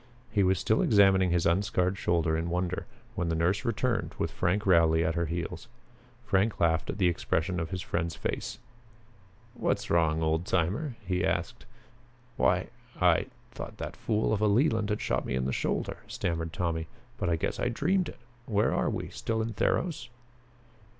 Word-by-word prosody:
He 105 - +2
was 95 0 +3
still 110 +5 +2
examining 95 -3 +5
his 85 -1 +1
unscarred 90 +1 +2
shoulder 85 -4 +1
in 80 +1 -2
wonder, 90 +1 -2 0.3
when 90 -6 -1
the 80 - 0
nurse 90 +5 +1
returned, 115 0 -1
with - - -1
Frank 100 +5 0
Rowley 80 -3 +4
at 80 - +1
her 85 0 -1
heels. 85 +7 -4 0.6
Frank 100 +3 +1
laughed 80 -1 +2
at - - -3
the 95 -4 +3
expression 85 +1 0
of 80 -1 -3
his 90 -1 -4
friend's 85 -1 -2
face. - - -3 1.0
"What's - - -1
wrong, 80 -1 +3
old 80 +2 0
timer?" 100 - 0
he 90 -1 0
asked. 115 +8 -2 0.7
"Why - - +2 0.3
I - - +4 0.2
thought - - -8
that - - -5
fool 110 0 0
of 105 - 0
a 110 - +4
Leland 110 -1 +2
had 105 - -1
shot - - 0
me 65 - -2
in 65 0 0
the 65 - -1
shoulder," - - -1
stammered 80 -1 -2
Tommy, 85 -3 -2 0.3
"but - - 0
I 85 - +3
guess 80 - -2
I - - +1
dreamed 180 +9 +1
it. - - -11 0.3
Where 105 -2 +2
are - - +1
we? - - -3
Still 115 -1 -2
in 110 0 -2
Theros?" 135 - 0
90 Hz, 175 wpm, -29 LUFS, 85-105 Hz, 1.0 s, examining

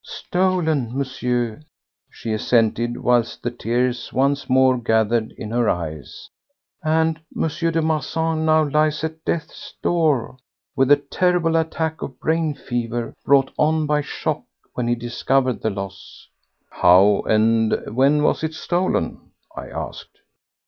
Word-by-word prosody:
"Stolen, 160 -9 -1
Monsieur," 125 -3 -2 0.5
she 110 - -5
assented 115 +1 +1
whilst 120 -1 +1
the 120 - -1
tears 120 +1 -1
once 140 +1 0
more 130 -1 +4
gathered 110 -1 +1
in 110 - -6
her 120 -1 +1
eyes, 80 -4 -5 0.6
"and 160 +1 +1 0.2
M. - - +2
de 165 +1 -1
Marsan 160 +1 -1
now 155 -1 +3
lies 150 +1 +1
at 160 0 -5
death's 165 - -4
door 150 -8 +1 0.4
with 135 +1 +2
a - - +10
terrible 165 +3 0
attack 160 -1 -1
of 130 -2 -7
brain 160 0 0
fever, 120 -2 -3
brought 135 -1 +3
on 155 0 +2
by 150 0 +1
shock - - -3 0.3
when 125 -1 -2
he 120 - +2
discovered 120 +2 0
the 110 - 0
loss." 100 -2 -8 0.4
"How 95 +3 +5
and 110 0 +2
when 140 +3 +3
was 150 - +1
it 160 0 -2
stolen?" 180 +3 -2 0.2
I - - -7
asked. - - -8
135 Hz, 135 wpm, -21 LUFS, 120-160 Hz, 0.6 s, a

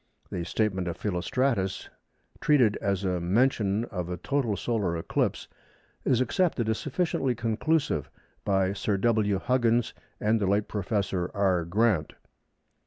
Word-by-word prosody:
The 85 - -3
statement 95 -1 0
of 85 - -3
Philostratus, 100 +1 -1 0.5
treated 125 -8 +4
as 100 -1 -1
a 90 -1 0
mention 105 +2 +2
of 90 -6 -5
a 90 - -3
total 120 - -1
solar 100 -8 -1
eclipse, 80 - -1 0.6
is 130 -2 +2
accepted 130 -2 +1
as 110 - 0
sufficiently 145 -4 -1
conclusive 115 - 0 0.3
by 95 -1 +1
Sir 100 0 -1
W. 105 -1 +2
Huggins 120 +1 +1 0.3
and 110 +1 +1
the 100 - +1
late 100 +2 +1
Professor 100 -3 -1
R. 95 -4 +2
Grant. 95 -3 +1
105 Hz, 130 wpm, -27 LUFS, 95-120 Hz, 0.6 s, treated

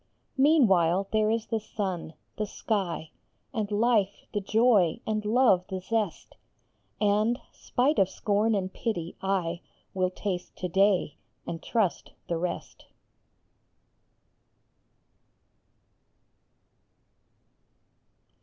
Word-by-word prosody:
Meanwhile 195 - +4
there 215 -1 +2
is 225 0 0
the 225 - -1
sun, 190 -6 -4 0.2
the 215 - -2
sky, 190 -8 -2 0.4
And 215 -3 -2
life 210 -2 +1
the 205 - 0
joy, 215 -4 +3
and 215 -1 -1
love 215 -4 +4
the 190 - -4
zest; 210 -1 -3 0.6
And, 215 +3 +2
spite 275 +5 0
of 190 -1 +4
scorn 210 +3 +1
and 190 -1 -2
pity, 175 -8 -3
I 180 -3 -1 0.3
Will 185 -1 +1
taste 185 -1 -4
to 180 - -3
day, 190 -4 +2 0.3
and 165 - -5
trust 215 -7 -1
the 170 - -1
rest. 180 +1 -5
200 Hz, 100 wpm, -28 LUFS, 185-220 Hz, 0.6 s, Meanwhile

